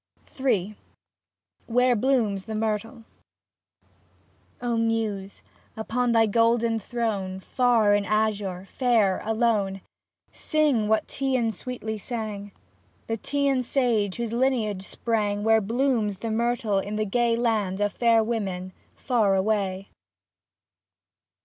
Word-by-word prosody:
23 245 -9 +1
m 215 - -13 0.9
WHERE 250 +1 +3
BLOOMS 220 -5 +1
THE 220 - -5
MYRTLE 225 +2 -2 1.6
O 240 -1 -1
Muse, 225 -4 -2 0.3
upon 240 +2 0
thy 225 -1 +5
golden 230 +1 +2
throne, 205 -4 -3
Far 230 -1 +2
in 205 - +3
the 200 - -7
azure, 205 -4 0
fair, 220 -5 +1
alone. 215 -4 0 0.5
Sing 295 -9 +1
what 220 0 +1
the - - -8
Teian 255 -4 0
sweetly 220 0 -5
sang, 210 -3 -5 0.3
— - - -37
The 225 -1 -3
Teian 280 +1 0
sage 235 -6 0
whose 235 -1 -3
lineage 235 -6 0
sprang 205 -3 -1
Where 220 0 +4
blooms 225 -2 0
the 225 +3 -4
myrtle 230 -3 0
in 205 +2 -4
the 215 0 0
gay 235 +3 +1
Land 215 -5 0
of 205 0 0
fair 230 -2 +3
women 190 -5 -3 0.2
far 220 -6 +1
away. 195 -1 -1
220 Hz, 125 wpm, -25 LUFS, 205-240 Hz, 1.6 s, thy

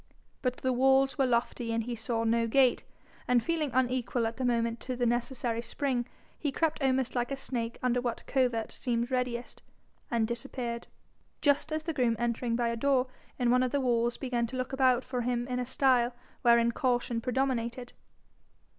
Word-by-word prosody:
But 255 -1 -1
the 260 0 0
walls 265 +1 +3
were 265 - +4
lofty 235 -1 0
and 230 0 0
he 240 +1 -4
saw 225 0 -2
no 230 0 +2
gate, 255 +1 +3 0.4
and 245 -2 +3
feeling 325 -3 0
unequal 250 -1 +1
at 225 0 -3
the 260 - -3
moment 235 -1 +1
to 255 - -4
the 245 0 0
necessary 240 -1 -1
spring, 245 0 -1 0.3
he 290 - -1
crept 315 +2 0
almost 260 -2 +1
like 245 0 0
a 275 - -2
snake 235 -4 -3
under 250 -1 +2
what 240 -1 -3
covert 245 -4 0
seemed 240 0 -2
readiest, 250 -1 -2 0.5
and 230 -2 +1
disappeared 235 0 -4 0.5
just 290 +1 +2
as 310 0 -1
the 325 0 -2
groom 245 -5 +2
entering 235 0 -1
by 235 0 +1
a 230 - -1
door 260 +1 +2 0.3
in 245 -2 +2
one 250 +1 +4
of 255 -1 +1
the 285 - +1
walls 240 -2 +1
began 245 -3 -1
to 260 - -7
look 255 +1 -3
about 260 -2 +3
for 250 -1 -3
him 240 0 -1
in 250 -1 -2
a 250 - -3
style 255 -2 +2 0.3
wherein 235 -1 +5
caution 245 -1 0
predominated. 250 -1 -1
245 Hz, 185 wpm, -30 LUFS, 235-260 Hz, 0.5 s, wherein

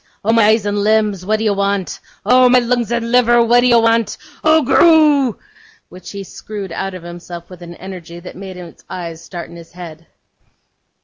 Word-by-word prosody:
Oh, 225 - +3
my 230 -2 +4
eyes 220 -1 +2
and 205 0 -1
limbs, 210 -2 +1
what 215 +1 +2
do 220 - -3
you 210 - +2
want? 200 -1 -2 0.3
Oh, 250 0 +5
my 250 - +5
lungs 240 -1 0
and 235 -1 -2
liver, 240 -1 +4
what 240 +1 +4
do 245 - +3
you 235 -1 +5
want? 230 -1 +1 0.3
Oh, 315 0 +4
goroo!' 295 -4 +4 0.5
which 180 +1 -12
he 200 -1 -7
screwed 200 0 -8
out 195 +3 -4
of 180 - -10
himself, 175 0 -10
with 180 -1 -12
an 175 0 -10
energy 175 -2 -10
that 180 - -11
made 190 0 -9
his 175 -2 -12
eyes 170 -2 -7
start 175 -2 -8
in - - -12
his 165 0 -14
head. 165 -2 -11
205 Hz, 200 wpm, -17 LUFS, 180-235 Hz, 0.5 s, Oh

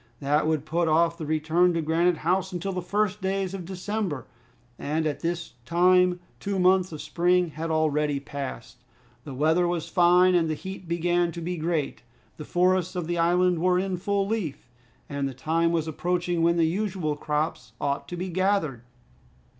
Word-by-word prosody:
That 145 +2 +1
would 155 -2 0
put 165 +2 0
off 165 +2 +3
the 155 - -5
return 160 +3 +2
to 165 - +1
Granite 165 +2 +2
House 190 +2 +1
until 185 +2 -3
the 180 - -2
first 205 +2 -1
days 190 0 -1
of 185 -3 -5
December. 190 - -3 0.5
At 155 0 -1
this 170 0 -3
time 180 +3 +3 0.2
two 200 -1 -2
months 185 0 +3
of 155 - -7
spring 175 +3 +2
had 160 +2 -5
already 150 -2 +1
passed. 140 -3 -7 0.4
The 140 -3 -7
weather 160 +5 +2
was 175 -2 -2
fine, 180 0 +5
and 165 -2 +2
the 155 - -1
heat 190 +2 -8
began 175 +1 +1
to 170 - -6
be 180 +2 -3
great. 160 -3 -2 0.4
The 150 - -7
forests 185 0 +1
of 175 -2 -2
the 175 +1 -2
island 175 +1 +3
were 180 +1 +3
in 190 0 -1
full 200 +2 0
leaf, 195 - -3 0.4
and 140 -1 -2
the 130 - -9
time 165 +5 +1
was 165 -2 0
approaching 175 +1 -1
when 170 +1 +3
the 165 - +4
usual 180 -3 -1
crops 150 +1 -3
ought 140 0 -2
to 175 - -6
be 185 +2 -3
gathered. 185 - 0
170 Hz, 180 wpm, -26 LUFS, 155-180 Hz, 0.5 s, fine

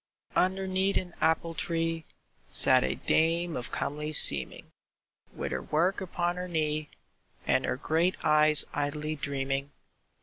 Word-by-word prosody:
Underneath 190 +1 -1
an 180 -2 -6
apple 165 +1 0
tree 165 -1 -3 0.5
Sat - - +4
a - - -2
dame 165 +1 -1
of 125 - -5
comely 150 +2 -5
seeming, 70 - +6 0.6
With - - -7
her 65 -1 -4
work 170 - -1
upon 175 -1 -3
her 180 0 -6
knee, 155 -3 -3 0.6
And - - 0
her - - -3
great 170 +4 -1
eyes 155 0 +6
idly 150 +2 -4
dreaming. 140 0 -4
160 Hz, 130 wpm, -27 LUFS, 150-175 Hz, 0.6 s, seeming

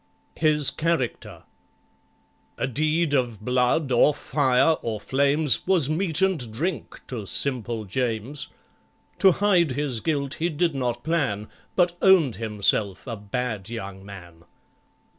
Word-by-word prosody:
His 150 -3 +2
Character 120 - -3 1.1
A - - -1
deed 155 +4 0
of 120 -6 -1
blood, 125 +3 +1
or 135 +4 +4
fire, 135 0 +2
or 110 -2 -4
flames, 140 +6 +3
Was 170 -7 +4
meat 165 +1 0
and 160 - 0
drink 160 +10 -4
to 110 -6 -7
SIMPLE 120 -4 -1
JAMES: 120 +5 -3 0.7
To 190 - +6
hide 180 -8 +2
his 135 -4 -2
guilt 140 -1 -2
he 170 +2 0
did 165 +1 0
not 125 -3 -3
plan, 135 -11 -1 0.3
But 175 -1 +1
owned 165 - +4
himself 105 -2 0
a 120 -3 -5
bad 110 0 -4
young 100 -5 -7
man. 90 -4 -13
130 Hz, 125 wpm, -24 LUFS, 110-155 Hz, 1.1 s, To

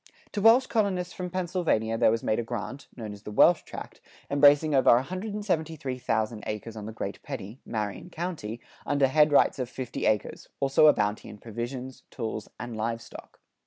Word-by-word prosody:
To 205 - -2
Welsh 230 +5 +7
colonists 190 -7 0
from 180 -1 -5
Pennsylvania 175 - 0
there 115 - +4
was 115 +1 0
made 110 - +1
a - - -1
grant 120 +4 -6
known 110 -3 -6
as 100 - -12
the - - -8
"Welsh 165 +11 +5
tract," - - -9 0.3
embracing 145 +2 +5
over 135 - +5
173,000 155 - -2
acres 110 +1 -5
on 105 -1 -7
the - - -5
Great 110 - -5
Pedee 105 +7 -7
(Marion 105 - -4
County)[97:1] 160 -11 -5 0.3
under 145 -1 +3
headrights 145 0 +4
of 125 -2 -2
fifty 130 -2 -3
acres, 105 -1 -1
also 135 +3 +5
a 150 - +8
bounty 105 0 -1
in 105 - -10
provisions, 120 +4 -6
tools, 110 -3 -5
and 120 0 -6
livestock. 115 +1 -5
130 Hz, 165 wpm, -27 LUFS, 110-165 Hz, 0.3 s, a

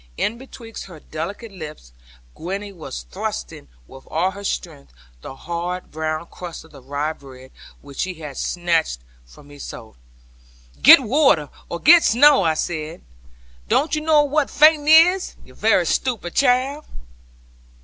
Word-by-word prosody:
In 230 +2 -2
betwixt 240 -4 -10
her 175 -5 -12
delicate 195 +10 -7
lips, 155 - -10 0.4
Gwenny 195 +4 -6
was 155 - -8
thrusting - - -6 0.2
with 135 - -15
all 180 +4 0
her 200 +1 -10
strength 70 - -5 0.3
the 135 - -9
hard 175 +4 -5
brown 155 +1 -3
crust 175 -1 -9
of 160 - -19
the 140 - -14
rye 145 +4 -3
bread, 130 -3 -15 0.3
which 140 -1 -13
she 185 -1 -2
had 150 -4 -9
snatched 165 - -1 0.3
from 100 - -17
me 145 0 -14
so. 110 -4 -10 0.9
'Get - - +9
water, 245 - +2 0.2
or 170 - -4
get 335 - +7
snow,' 280 +3 +5
I 160 -3 +1
said; 160 +1 -4 0.6
'don't 305 - +1
you 305 - 0
know 305 -1 +4
what 290 0 0
fainting 300 0 +4
is, 340 +4 +5
you - - -17
very - - +2
stupid 225 -10 -2
child?' 275 +2 +1
175 Hz, 150 wpm, -21 LUFS, -, 0.9 s, Get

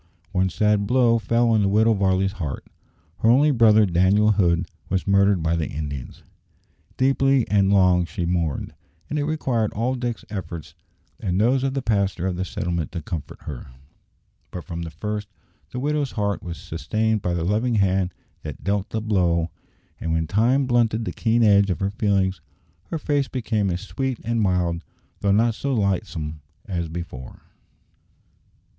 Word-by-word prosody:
One 95 -1 +1
sad 105 +2 +1
blow 120 -1 +4
fell 115 +3 +2
on 110 -2 +3
the 100 - +2
Widow 110 +3 +4
Varley's 95 -1 +1
heart. 75 -4 -4 0.5
Her 110 - +3
only 140 +5 +5
brother, 110 -4 +5
Daniel 95 +4 +3
Hood, 90 -5 +2 0.2
was 95 0 0
murdered 100 -3 +3
by 80 +1 +1
the 80 -2 -2
Indians. 70 -3 -6 0.7
Deeply 135 -1 +3
and 100 -1 +3
long 90 -3 +4
she 85 +1 -4
mourned, 85 -4 -1 0.4
and 150 - 0
it 145 - 0
required 130 -8 0
all 120 +5 0
Dick's 120 -3 -4
efforts 85 -6 -6 0.5
and 95 -4 -1
those 125 +5 +3
of 135 0 -1
the 135 - -2
pastor 100 -4 0
of 95 -1 -1
the 90 - -2
settlement 85 -3 -3
to 85 -4 -5
comfort 80 -1 -6
her. 70 -3 -7 0.8
But 90 - -7
from 85 -2 -6
the 85 - -5
first 105 +5 -4 0.4
the - - -7
widow's 145 0 -1
heart 100 -2 -1
was 85 -2 -6
sustained 110 +6 -1
by 90 -1 -1
the 85 - -1
loving 110 +6 +1
Hand 95 -2 +2 0.3
that - - -8
dealt 100 0 -1
the 110 - -2
blow, 90 -6 +1 0.5
and 80 - -3
when 80 0 +1
time 120 - +2
blunted 115 -2 +1
the - - -2
keen 115 0 +2
edge 100 -2 +5
of 90 - -1
her 95 0 -1
feelings 95 -4 0 0.4
her 165 - -4
face 145 -3 0
became 110 -5 -1
as 90 0 -2
sweet 130 +4 -3
and 115 0 0
mild, 90 -3 0 0.4
though 100 - +1
not 115 +3 +3
so 135 +4 -2
lightsome, 95 -7 -2 0.3
as 85 -4 -3
before. 80 -7 -8
100 Hz, 170 wpm, -23 LUFS, 90-115 Hz, 0.8 s, only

